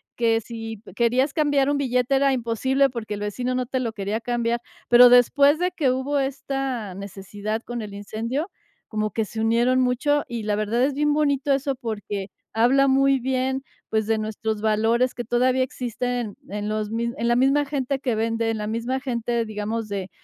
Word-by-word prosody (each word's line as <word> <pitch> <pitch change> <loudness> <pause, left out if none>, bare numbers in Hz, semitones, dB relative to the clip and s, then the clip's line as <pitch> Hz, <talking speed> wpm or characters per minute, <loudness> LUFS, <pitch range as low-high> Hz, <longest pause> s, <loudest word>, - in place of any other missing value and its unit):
que 230 -1 +2
si 225 -2 -7
querías 250 +5 +2
cambiar 285 -3 +2
un 290 - +1
billete 250 -1 +1
era 275 0 +3
imposible 260 +3 +1
porque 230 -4 -5
el - - -7
vecino 245 +5 -2
no 250 -1 -1
te 260 0 -1
lo 235 -3 -2
quería 205 +1 -2
cambiar, 235 0 -1 0.3
pero 245 +1 +9
después 280 +5 +5
de 360 +1 +1
que 280 -8 +1
hubo 265 +3 -1
esta 270 -6 -3
necesidad 200 +3 -5
con 240 -1 -5
el 205 -1 -8
incendio, 230 - -3 0.4
como 215 -1 -1
que 220 +2 -1
se 220 +2 -7
unieron 235 +3 +3
mucho, 270 +4 +1
y 235 -2 -4
la 210 -1 0
verdad 215 +4 0
es 280 +2 +2
bien 295 +1 +2
bonito 285 -2 +2
eso 275 0 0
porque 210 -5 -5 0.2
habla 260 +5 +4
muy 275 0 +4
bien, 260 +1 -1 0.3
pues, 220 -1 0
de 225 0 +2
nuestros 215 0 -3
valores 225 +3 +2
que 240 - -5
todavía 255 +3 +2
existen 245 -3 -3
en 210 +1 -3
los 215 -1 -2
mis 235 +1 -1
en 230 - -1
la 240 - +3
misma 275 +3 +3
gente 275 -1 -2
que 250 -4 -1
vende, 225 +1 0
en 225 - -2
la 210 - -3
misma 235 +4 -2
gente, 235 -3 -1
digamos, 215 +1 -3
de 195 -2 -4
240 Hz, 190 wpm, -24 LUFS, 220-265 Hz, 0.4 s, pero